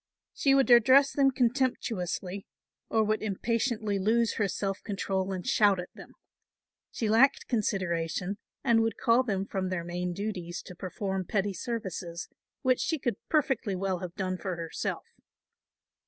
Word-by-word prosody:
She 275 Hz, -1 st, +3 dB
would 270 Hz, -2 st, +3 dB
address 260 Hz, +4 st, +7 dB
them 275 Hz, -1 st, +4 dB
contemptuously, 230 Hz, -7 st, -1 dB, 0.4 s
or 220 Hz, -1 st, +3 dB
would 215 Hz, 0 st, 0 dB
impatiently 215 Hz, 0 st, -1 dB
lose 225 Hz, +3 st, +2 dB
her 210 Hz, -, +2 dB
self 195 Hz, +1 st, -3 dB
control 195 Hz, -2 st, -2 dB
and 185 Hz, -2 st, -4 dB
shout 205 Hz, -3 st, +4 dB
at 180 Hz, -, -7 dB
them. -, -, -13 dB, 0.8 s
She 225 Hz, -, -2 dB
lacked 245 Hz, +6 st, +4 dB
consideration 185 Hz, -3 st, -1 dB, 0.2 s
and 235 Hz, -3 st, +4 dB
would 225 Hz, -1 st, 0 dB
call 235 Hz, +2 st, +4 dB
them 200 Hz, -6 st, -1 dB
from 190 Hz, -1 st, -2 dB
their 185 Hz, -2 st, -2 dB
main 175 Hz, +1 st, -3 dB
duties 180 Hz, -3 st, -4 dB
to 180 Hz, -, -10 dB
perform 190 Hz, +1 st, -3 dB
petty 200 Hz, +1 st, 0 dB
services, 185 Hz, -6 st, -5 dB, 0.4 s
which 255 Hz, -1 st, +3 dB
she 320 Hz, -, 0 dB
could 240 Hz, -6 st, -2 dB
perfectly 265 Hz, -9 st, +1 dB
well 190 Hz, -1 st, -1 dB
have 180 Hz, -1 st, -7 dB
done 185 Hz, -2 st, -2 dB
for 185 Hz, -3 st, -3 dB
herself. 165 Hz, -1 st, -4 dB
200 Hz, 150 wpm, -29 LUFS, 185-235 Hz, 0.8 s, address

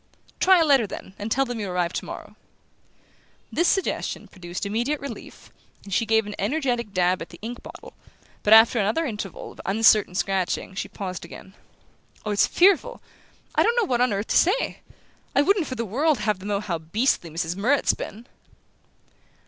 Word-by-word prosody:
"Try 375 Hz, -1 st, +6 dB
a 330 Hz, -, +4 dB
letter, 270 Hz, -7 st, +4 dB
then 190 Hz, -, -9 dB
and 210 Hz, +2 st, -5 dB
tell 270 Hz, +3 st, +2 dB
them 245 Hz, -2 st, -5 dB
you'll 205 Hz, -3 st, -3 dB
arrive 180 Hz, -1 st, -1 dB
tomorrow." -, -, -7 dB, 1.2 s
This 340 Hz, -, +1 dB
suggestion 385 Hz, -, -1 dB
produced 180 Hz, 0 st, -7 dB
immediate 240 Hz, +8 st, -1 dB
relief, 280 Hz, -, -9 dB, 0.3 s
and 195 Hz, -, -8 dB
she 230 Hz, -, +1 dB
gave 220 Hz, 0 st, +3 dB
an 210 Hz, -, -6 dB
energetic 240 Hz, -2 st, -1 dB
dab 180 Hz, -1 st, +1 dB
at 165 Hz, -, -7 dB
the 170 Hz, -, -12 dB
ink 240 Hz, +2 st, -6 dB
bottle; -, -, -12 dB, 0.5 s
but 210 Hz, -, 0 dB
after 225 Hz, +2 st, +7 dB
another 215 Hz, +11 st, +1 dB
interval 210 Hz, -, -6 dB
of -, -, -12 dB
uncertain 210 Hz, -1 st, +4 dB
scratching 190 Hz, -1 st, -1 dB
she 195 Hz, -, -4 dB
paused 185 Hz, -3 st, -6 dB
again. 180 Hz, +2 st, -11 dB, 0.7 s
"Oh, 210 Hz, -, -1 dB
it's 205 Hz, -, +3 dB
fearful! 400 Hz, +7 st, +3 dB, 0.5 s
I -, -, +3 dB
don't 470 Hz, -, +3 dB
know 480 Hz, -, +3 dB
what 245 Hz, -8 st, 0 dB
on 250 Hz, -, +3 dB
earth 200 Hz, +1 st, -2 dB
to -, -, +3 dB
say. 385 Hz, +8 st, +2 dB, 0.6 s
I 285 Hz, -, +5 dB
wouldn't 385 Hz, -1 st, +2 dB
for 255 Hz, -, -4 dB
the 230 Hz, -1 st, -3 dB
world 285 Hz, +8 st, +1 dB
have 210 Hz, -3 st, 0 dB
them 195 Hz, -, -8 dB
know 205 Hz, -1 st, -1 dB
how 175 Hz, -6 st, -3 dB
beastly 170 Hz, +3 st, 0 dB
Mrs. 165 Hz, +2 st, -3 dB
Murrett's 250 Hz, +9 st, +2 dB
been." 225 Hz, +4 st, -8 dB
215 Hz, 180 wpm, -24 LUFS, 195-270 Hz, 1.2 s, after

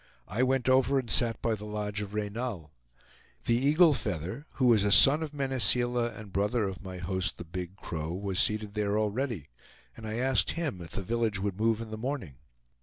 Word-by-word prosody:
I 105 Hz, +4 st, -2 dB
went 130 Hz, -1 st, +1 dB
over 130 Hz, +1 st, +4 dB
and 125 Hz, -4 st, -2 dB
sat 115 Hz, -2 st, +3 dB
by 115 Hz, -, +1 dB
the 105 Hz, -1 st, -6 dB
lodge 105 Hz, -1 st, -3 dB
of 105 Hz, 0 st, -6 dB
Reynal. 105 Hz, -6 st, -4 dB, 0.7 s
The -, -, +2 dB
Eagle 150 Hz, +6 st, +5 dB
Feather, 95 Hz, -, -4 dB
who 130 Hz, -, 0 dB
was 115 Hz, -5 st, +5 dB
a 105 Hz, -, +1 dB
son 145 Hz, +8 st, +7 dB
of 155 Hz, -2 st, -4 dB
Mene 135 Hz, -3 st, -2 dB
Seela, 120 Hz, +2 st, +3 dB
and 105 Hz, -4 st, -11 dB
brother 105 Hz, +4 st, +1 dB
of 95 Hz, -2 st, -4 dB
my 95 Hz, -2 st, -7 dB
host 95 Hz, +1 st, -2 dB
the 85 Hz, -, -8 dB
Big 90 Hz, +2 st, -6 dB
Crow, 80 Hz, -4 st, -5 dB
was 95 Hz, +1 st, -2 dB
seated 105 Hz, -1 st, +1 dB
there 105 Hz, -1 st, 0 dB
already, 110 Hz, -, -2 dB, 0.5 s
and 110 Hz, -1 st, -8 dB
I 110 Hz, -, -3 dB
asked 130 Hz, +1 st, +2 dB
him 150 Hz, -, -3 dB
if 85 Hz, -, -9 dB
the 100 Hz, -, -3 dB
village 115 Hz, -1 st, -1 dB
would 100 Hz, 0 st, -3 dB
move 115 Hz, 0 st, +2 dB
in 110 Hz, -1 st, -7 dB
the 110 Hz, -, -6 dB
morning. 115 Hz, -, -4 dB
110 Hz, 205 wpm, -29 LUFS, 100-125 Hz, 0.7 s, son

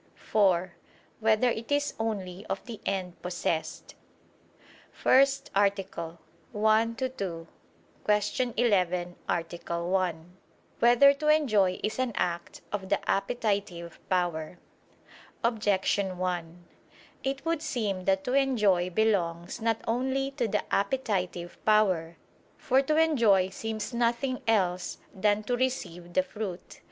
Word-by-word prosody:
(4) 185 Hz, -4 st, +1 dB, 0.5 s
Whether 220 Hz, +2 st, +3 dB
it 230 Hz, +3 st, -5 dB
is 290 Hz, 0 st, +1 dB
only 200 Hz, -4 st, -3 dB
of -, -, -4 dB
the 230 Hz, -3 st, -8 dB
end 185 Hz, -3 st, -3 dB
possessed? 175 Hz, -2 st, -3 dB, 0.7 s
________________________ -, -, -26 dB, 0.3 s
FIRST 275 Hz, +1 st, +3 dB
ARTICLE 195 Hz, -4 st, 0 dB, 0.4 s
[I 215 Hz, +1 st, +4 dB
II, 230 Hz, -, -7 dB
Q. 175 Hz, -9 st, -5 dB, 1.1 s
11, 180 Hz, -6 st, +1 dB
Art. 165 Hz, -1 st, -1 dB, 0.2 s
1] 175 Hz, 0 st, -1 dB, 0.4 s
Whether 245 Hz, +4 st, +7 dB
to 300 Hz, +2 st, -4 dB
Enjoy 215 Hz, -12 st, +3 dB
Is 215 Hz, +4 st, -2 dB
an 255 Hz, -3 st, 0 dB
Act 170 Hz, -1 st, -2 dB
of 195 Hz, -2 st, -4 dB
the 200 Hz, -, +2 dB
Appetitive 200 Hz, -5 st, -1 dB
Power? 175 Hz, -2 st, -1 dB, 0.9 s
Objection 200 Hz, -4 st, +1 dB
1: 175 Hz, -1 st, -3 dB, 0.6 s
It 270 Hz, +2 st, -3 dB
would 330 Hz, -2 st, 0 dB
seem 205 Hz, -11 st, -2 dB
that 190 Hz, 0 st, +2 dB
to 250 Hz, -, -2 dB
enjoy 210 Hz, -10 st, +3 dB
belongs 180 Hz, -1 st, 0 dB
not 225 Hz, 0 st, 0 dB
only 265 Hz, +4 st, 0 dB
to 265 Hz, -4 st, -1 dB
the 210 Hz, -1 st, 0 dB
appetitive 195 Hz, -6 st, -1 dB
power. 185 Hz, -6 st, +2 dB, 0.4 s
For 265 Hz, +1 st, +3 dB
to 305 Hz, +3 st, 0 dB
enjoy 230 Hz, -13 st, +4 dB
seems 220 Hz, +3 st, -5 dB
nothing 240 Hz, +2 st, 0 dB
else 185 Hz, -5 st, +1 dB, 0.2 s
than 205 Hz, +1 st, +1 dB
to 245 Hz, +3 st, 0 dB
receive 180 Hz, -9 st, -3 dB
the 185 Hz, -, +3 dB
fruit. 190 Hz, -3 st, -7 dB
205 Hz, 120 wpm, -28 LUFS, 180-240 Hz, 1.1 s, Whether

